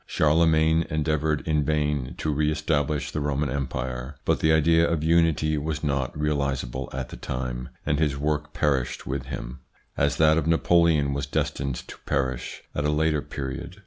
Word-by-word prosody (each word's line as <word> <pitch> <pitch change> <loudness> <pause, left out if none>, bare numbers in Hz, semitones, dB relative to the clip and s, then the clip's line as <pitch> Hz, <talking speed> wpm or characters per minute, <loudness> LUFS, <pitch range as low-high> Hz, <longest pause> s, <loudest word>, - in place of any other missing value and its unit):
Charlemagne 80 +1 +3
endeavoured 75 0 0
in 75 -2 +2
vain 75 -3 -1
to 75 - -1
re 75 +1 +1
establish 75 -1 0
the - - -2
Roman 70 -1 -1
Empire, 65 -1 -3
but - - +2
the 80 - +3
idea 80 +1 +4
of 80 -2 0
unity 80 -2 +3
was 75 +1 -3
not 70 -1 -1
realisable 70 -4 -1
at 65 -1 -4
the - - -8
time, 60 -1 -4 0.2
and 75 0 +1
his 75 -3 +1
work 75 +1 -1
perished 70 -4 0
with 65 -1 -4
him, 65 0 -6 0.4
as 70 0 +1
that 80 0 +5
of 80 - -3
Napoleon 80 -3 +3
was 70 -1 -3
destined 70 0 -1
to - - -10
perish 65 -2 -2
at 75 - -1
a 75 - +1
later 75 0 +1
period. 75 +8 -6
75 Hz, 170 wpm, -25 LUFS, 70-80 Hz, 0.4 s, that